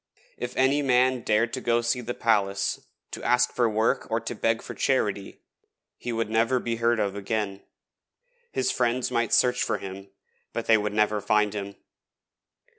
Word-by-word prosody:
If 125 0 -6
any 135 +3 +3
man 130 -1 +3
dared 115 +1 +1
to 130 - -3
go 120 -1 +2
to - - -11
see 125 +1 +1
the 120 +1 -5
palace, 100 -4 +1 0.3
to - - -7
ask 125 0 +2
for 120 -2 +2
work 110 +1 0
or 115 0 +1
to 115 +1 -5
beg 115 0 0
for - - -7
charity, 105 -7 -1 0.5
he 120 - -5
would 115 -1 -1
never 115 +3 +2
be 115 -1 -3
heard 115 0 +2
of 100 -2 -1
again. 100 -1 -3 0.9
His 390 - 0
friends 125 0 0
might 120 -1 0
search 125 0 +3
for - - 0
him, 95 0 -8 0.4
but 115 - -3
they 115 - +5
would 105 -1 -1
never 105 -1 +2
find 105 0 +2
him. 100 -1 -5
115 Hz, 180 wpm, -26 LUFS, 105-125 Hz, 0.9 s, they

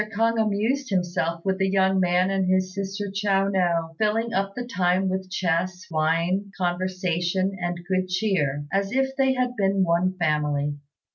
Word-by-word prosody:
K'ung 230 +1 +2
amused 220 +6 0
himself 175 -3 -1
with 190 0 0
the 190 0 +2
young 190 0 +3
man 180 +1 +2
and 195 -1 0
his 185 0 +1
sister 200 0 -4
Chiao 195 -1 +1
no, 170 -4 0
filling 225 +2 +1
up 195 +1 -1
the 245 - -4
time 185 -3 +1
with 190 0 -3
chess, 180 0 -1
wine, 165 +5 +1
conversation, 185 +1 -1
and 175 0 -3
good 185 -1 0
cheer, 180 -8 0
as 195 0 0
if 265 +1 0
they 265 -1 +3
had 250 -1 -1
been 195 -2 +2
one 180 +2 +1
family. 150 -3 0
185 Hz, 160 wpm, -24 LUFS, 175-200 Hz, -, young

